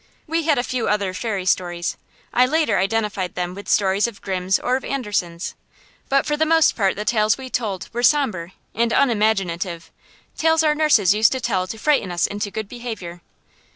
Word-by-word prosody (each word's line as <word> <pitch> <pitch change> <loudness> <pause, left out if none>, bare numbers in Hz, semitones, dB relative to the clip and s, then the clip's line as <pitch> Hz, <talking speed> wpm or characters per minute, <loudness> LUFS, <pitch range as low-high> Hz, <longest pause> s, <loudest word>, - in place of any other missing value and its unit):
We 325 0 -1
had 305 -3 +3
a 245 - +1
few 250 -2 -2
other 200 -2 0
fairy 200 -1 -3
stories, 175 -2 0 0.4
I 250 +1 +4
later 310 - +1
identified 195 -2 -1
them 180 0 -3
with 200 +2 -9
stories 195 +1 +2
of 225 -4 -9
Grimm's 190 0 0
or 250 - 0
of 265 - -3
Andersen's, 200 -10 -3 0.6
but 275 0 +2
for 295 - 0
the 305 - +1
most 320 0 +4
part 195 -4 +1
the 210 - -5
tales 215 -2 +2
we 260 -1 -9
told 205 -6 -2
were 240 - -2
sombre 225 - +2 0.2
and 230 +2 +1
unimaginative; 195 -9 0 0.4
tales 320 0 +3
our 305 -1 +3
nurses 295 - +4
used 215 +3 +4
to 260 - -2
tell 200 -7 -1
to 220 - -6
frighten 250 -7 +1
us 175 0 +1
into 205 0 -3
good 215 +1 -5
behavior. 215 -8 -7
215 Hz, 190 wpm, -21 LUFS, 185-255 Hz, 0.6 s, I